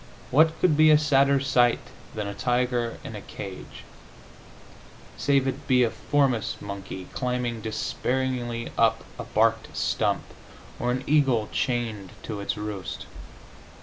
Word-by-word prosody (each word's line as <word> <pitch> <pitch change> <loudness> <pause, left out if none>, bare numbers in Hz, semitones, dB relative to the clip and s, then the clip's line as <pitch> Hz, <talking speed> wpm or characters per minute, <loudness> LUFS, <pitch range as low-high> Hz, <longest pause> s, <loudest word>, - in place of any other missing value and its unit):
What 160 +4 +4
could 175 -5 +4
be 155 +1 +6
a 155 - +8
sadder 140 -2 +4
sight 125 -3 +3 0.4
than 105 -1 -2
a 100 - -4
tiger 120 +1 0
in - - -7
a - - -6
cage, 95 -2 -9 1.3
save 140 -2 +2
it 135 +2 -4
be 125 -2 +5
a 115 - +1
forest 135 -6 0
monkey 95 -2 -7
climbing 125 -3 -2
dispairingly 120 +2 -2
up 115 0 +3 0.2
a - - -4
barked 115 +1 +1
stump, - - 0 0.6
or 120 - -1
an 130 +1 -1
eagle 135 -7 +2
chained 115 -6 -2
to 105 -3 -5
its 100 - -3
roost? 105 -3 -5
120 Hz, 135 wpm, -26 LUFS, 110-135 Hz, 1.3 s, a